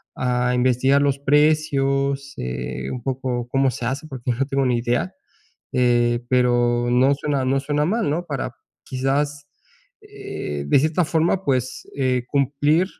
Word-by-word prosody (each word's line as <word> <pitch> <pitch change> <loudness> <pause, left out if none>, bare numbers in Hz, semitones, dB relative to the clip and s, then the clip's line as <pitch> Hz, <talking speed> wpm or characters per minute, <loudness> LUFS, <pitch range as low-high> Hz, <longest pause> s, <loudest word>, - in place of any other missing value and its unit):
a 125 0 0
investigar 130 +3 +3
los 140 -1 +1
precios, 140 -2 +1
eh, 65 +1 -4
un 125 - -5
poco 125 -2 -2
cómo 135 0 +2
se 120 - -5
hace, 135 +5 -3
porque 125 -3 -4
no 130 +3 0
tengo 135 -1 0
ni 125 -2 +2
idea. 120 -7 -1 0.6
Eh, 120 -1 +2
pero 120 -1 +2
no 130 +3 +4
suena 140 -1 -1
no 135 +1 +2
suena 145 +1 0
mal, 220 -1 0
¿no? 170 +4 -1
Para 135 -5 -4 0.3
quizás, 145 +3 -2 0.5
eh, 405 - -6
de - - +5
cierta 160 +3 +1
forma, 165 +4 +1
pues, 130 -2 -1
eh, 130 -2 +1
cumplir 145 +5 +2
135 Hz, 150 wpm, -22 LUFS, 125-145 Hz, 0.6 s, de